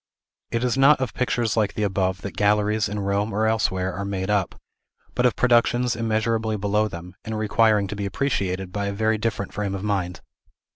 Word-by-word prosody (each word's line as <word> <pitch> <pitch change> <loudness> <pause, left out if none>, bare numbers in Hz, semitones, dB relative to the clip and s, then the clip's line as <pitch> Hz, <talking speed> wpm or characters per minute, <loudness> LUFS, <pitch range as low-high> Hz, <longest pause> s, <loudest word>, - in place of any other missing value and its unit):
It 115 +1 -1
is 125 +1 0
not 140 +2 +6
of 130 -2 -2
pictures 120 -3 0
like 105 -3 0
the 105 - -1
above 95 -2 -1
that 100 - -6
galleries, 105 +1 +2
in 105 0 -3
Rome 100 +2 0
or 110 +2 0
elsewhere, 95 -4 0
are 100 - -4
made 100 0 -2
up, 100 -3 0 0.5
but 125 0 +3
of 120 - -1
productions 120 0 +3
immeasurably 110 -1 0
below 105 +2 +1
them, 90 -1 -9
and 110 -1 -4
requiring 110 -1 +3
to 105 - -4
be 100 -1 -3
appreciated 95 -6 -2
by 100 +1 -2
a 100 - -2
very 110 +1 +1
different 105 -3 -2
frame 100 -1 -2
of 95 - -5
mind. 95 -4 -2
105 Hz, 195 wpm, -24 LUFS, 100-110 Hz, 0.5 s, not